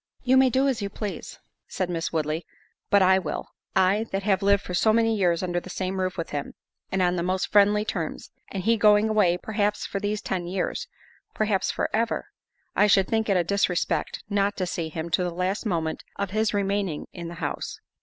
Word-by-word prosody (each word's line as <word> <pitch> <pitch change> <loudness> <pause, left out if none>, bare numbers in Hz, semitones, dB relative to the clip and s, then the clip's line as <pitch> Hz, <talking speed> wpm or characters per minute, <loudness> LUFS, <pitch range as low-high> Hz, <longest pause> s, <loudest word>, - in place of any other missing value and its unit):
"You 260 0 +4
may 260 0 +6
do 265 +2 +2
as 260 -5 0
you 200 - -2
please," 205 0 -6 0.3
said 185 - -2
Miss 165 -2 -2
Woodley, 155 +1 -1 0.5
"but 200 -1 +5
I 190 +1 +5
will. 185 - -4 0.3
I 190 +3 +3
that 195 0 -2
have 195 -2 +2
lived 200 0 +3
for 180 - -6
so 215 +5 +4
many 225 0 +3
years 180 -4 +1
under 175 -1 0
the 185 - -11
same 190 +1 -3
roof 185 -1 -1
with 165 - -4
him, 145 -1 -4 0.4
and 190 -1 +1
on 180 0 +2
the - - 0
most 185 +2 -1
friendly 210 +1 +4
terms, 165 -7 -4 0.2
and 190 -2 -3
he 230 +3 +3
going 210 0 +5
away, 200 -5 +3
perhaps 210 +1 -1
for 200 - -3
these 205 +1 -1
ten 180 -4 -3
years, 185 +1 -2 0.5
perhaps 210 -3 +1
for - - 0
ever, 230 +1 -1 0.5
I 210 - +5
should 195 -2 +4
think 220 -1 0
it 195 - +4
a 175 - +3
disrespect 180 -1 0
not 200 -1 0
to 185 - 0
see 170 -2 -3
him 160 +1 -5
to 180 - +2
the 180 - 0
last 185 +6 -2
moment 165 -4 -2
of 200 -2 -3
his 215 +1 +1
remaining 200 -5 -1
in 170 -2 -6
the 170 - -7
house." - - -4
195 Hz, 215 wpm, -25 LUFS, 180-210 Hz, 0.5 s, may